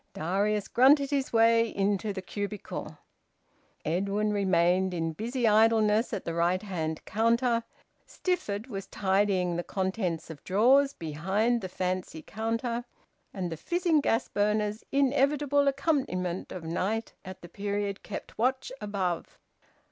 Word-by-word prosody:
Darius 200 Hz, +5 st, 0 dB
grunted 275 Hz, +3 st, +5 dB
his 275 Hz, -2 st, 0 dB
way 230 Hz, 0 st, +4 dB
into 200 Hz, +1 st, 0 dB
the 190 Hz, -1 st, -6 dB
cubicle. 205 Hz, +2 st, -5 dB, 0.9 s
Edwin 200 Hz, +6 st, 0 dB
remained 185 Hz, -1 st, +2 dB
in 165 Hz, -1 st, -2 dB
busy 235 Hz, -, -1 dB
idleness 220 Hz, +1 st, +4 dB
at -, -, -4 dB
the 165 Hz, -, -2 dB
right 175 Hz, +3 st, +1 dB
hand 160 Hz, -6 st, -4 dB
counter; 230 Hz, +2 st, +2 dB, 0.4 s
Stifford 220 Hz, -, -2 dB
was 195 Hz, -7 st, -6 dB
tidying 190 Hz, -3 st, +1 dB
the 175 Hz, -, -2 dB
contents 185 Hz, -4 st, -2 dB
of 150 Hz, -, -11 dB
drawers 265 Hz, +8 st, +4 dB
behind 190 Hz, -, 0 dB
the 185 Hz, -, -5 dB
fancy 180 Hz, -3 st, -3 dB
counter. 230 Hz, -, -2 dB, 0.5 s
And 180 Hz, -3 st, -4 dB
the 165 Hz, -, -4 dB
fizzing 345 Hz, -, +1 dB
gas 230 Hz, -3 st, +1 dB
burners, 210 Hz, +1 st, 0 dB
inevitable 280 Hz, +1 st, +2 dB
accompaniment 265 Hz, -, -1 dB
of 180 Hz, -, -6 dB
night 195 Hz, +7 st, -2 dB
at 185 Hz, -1 st, -10 dB
the -, -, -8 dB
period, 200 Hz, +1 st, -3 dB
kept -, -, -8 dB
watch 260 Hz, +2 st, 0 dB
above. 195 Hz, -5 st, -3 dB
205 Hz, 130 wpm, -28 LUFS, 185-235 Hz, 0.9 s, grunted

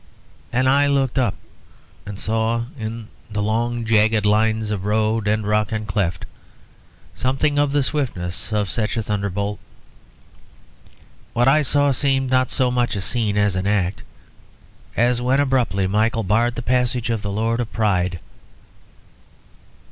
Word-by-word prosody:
Then 130 Hz, +2 st, +1 dB
I 140 Hz, +2 st, +4 dB
looked 135 Hz, -2 st, +1 dB
up 120 Hz, -6 st, +1 dB, 0.7 s
and 100 Hz, -1 st, -6 dB
saw 115 Hz, +2 st, 0 dB
in 115 Hz, -2 st, -6 dB, 0.2 s
the 105 Hz, -1 st, -2 dB
long 115 Hz, +2 st, -1 dB
jagged 110 Hz, -1 st, +3 dB
lines 110 Hz, +1 st, +2 dB
of 100 Hz, -3 st, -3 dB
road 110 Hz, +1 st, +1 dB
and 105 Hz, 0 st, +1 dB
rock 105 Hz, +1 st, +1 dB
and 110 Hz, -1 st, -2 dB
cleft 95 Hz, -4 st, -1 dB, 0.9 s
something 145 Hz, +3 st, 0 dB
of 145 Hz, -1 st, +2 dB
the 145 Hz, -1 st, +2 dB
swiftness 110 Hz, -, -3 dB
of 105 Hz, -3 st, 0 dB
such 115 Hz, 0 st, -2 dB
a 110 Hz, -, -1 dB
thunderbolt. 100 Hz, -1 st, -2 dB, 1.7 s
What 120 Hz, +1 st, +2 dB
I 155 Hz, +3 st, +5 dB
saw 145 Hz, 0 st, +2 dB
seemed 135 Hz, -1 st, +1 dB
not 130 Hz, -1 st, +3 dB
so 130 Hz, -2 st, +1 dB
much 120 Hz, -2 st, 0 dB
a 100 Hz, -, -2 dB
scene 105 Hz, 0 st, -1 dB
as 105 Hz, -2 st, +2 dB
an 95 Hz, +1 st, -1 dB
act; 95 Hz, -3 st, 0 dB, 1.0 s
as 120 Hz, +1 st, +2 dB
when 130 Hz, +3 st, +2 dB
abruptly 125 Hz, -9 st, +1 dB
Michael 110 Hz, +4 st, +1 dB
barred 115 Hz, +5 st, +1 dB
the 120 Hz, -, -5 dB
passage 125 Hz, -1 st, 0 dB
of 115 Hz, -2 st, -1 dB
the 100 Hz, -, -4 dB
Lord 115 Hz, +3 st, 0 dB
of 120 Hz, -2 st, -3 dB
Pride. 90 Hz, -5 st, 0 dB
110 Hz, 150 wpm, -21 LUFS, 105-125 Hz, 1.7 s, I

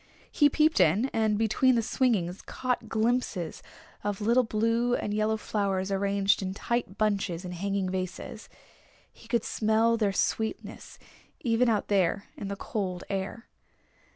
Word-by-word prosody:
He 290 Hz, -1 st, +5 dB
peeped 310 Hz, -1 st, +3 dB
in, 190 Hz, -, +4 dB
and 220 Hz, -2 st, +2 dB
between 225 Hz, +4 st, +3 dB
the 230 Hz, -, +1 dB
swingings 210 Hz, -7 st, 0 dB
caught 250 Hz, -3 st, -3 dB
glimpses 220 Hz, -7 st, -1 dB, 0.4 s
of 205 Hz, -1 st, -2 dB
little 235 Hz, +4 st, +4 dB
blue 230 Hz, +2 st, +1 dB
and 210 Hz, -, -3 dB
yellow 215 Hz, +1 st, +1 dB
flowers 195 Hz, -3 st, -1 dB
arranged 200 Hz, 0 st, +2 dB
in 190 Hz, 0 st, -3 dB
tight 235 Hz, -3 st, -2 dB
bunches 200 Hz, -4 st, 0 dB
in 180 Hz, -, -5 dB
hanging 195 Hz, +2 st, -2 dB
vases. 185 Hz, +5 st, -5 dB, 0.6 s
He 225 Hz, -, -17 dB
could 230 Hz, -1 st, +1 dB
smell 225 Hz, +1 st, +2 dB
their 210 Hz, -3 st, +1 dB
sweetness 220 Hz, +3 st, -2 dB, 0.4 s
even 235 Hz, -2 st, +2 dB
out 215 Hz, -2 st, +1 dB
there 195 Hz, -1 st, +1 dB
in 200 Hz, -, -6 dB
the 200 Hz, -, -3 dB
cold 190 Hz, -3 st, -4 dB
air. 195 Hz, +4 st, -4 dB
215 Hz, 145 wpm, -28 LUFS, 195-230 Hz, 0.6 s, He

